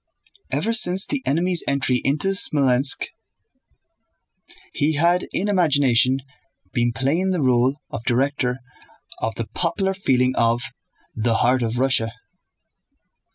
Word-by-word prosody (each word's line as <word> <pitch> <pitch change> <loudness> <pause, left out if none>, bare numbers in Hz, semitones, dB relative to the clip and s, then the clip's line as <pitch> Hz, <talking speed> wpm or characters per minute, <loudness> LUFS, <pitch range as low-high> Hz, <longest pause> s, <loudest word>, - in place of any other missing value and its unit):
Ever 230 - -1
since 190 -3 +4
the 285 -2 -2
enemy's 170 +4 +2
entry 135 -2 +1
into 145 +7 0
Smolénsk 135 -8 +2 1.6
he 150 +2 0
had 170 +4 +1
in 200 - -2
imagination 140 - +2 0.5
been 120 -2 0
playing 140 +11 -1
the 180 -4 -1
role 130 +2 +2
of 115 - -6
director 130 0 -1 0.6
of 110 0 -3
the 115 - -4
popular 185 - -2
feeling 130 -9 +1
of 115 +1 +1 0.5
"the 115 +1 0
heart 125 +3 +2
of 115 0 -2
Russia." 125 -3 0
135 Hz, 115 wpm, -21 LUFS, 125-175 Hz, 1.6 s, since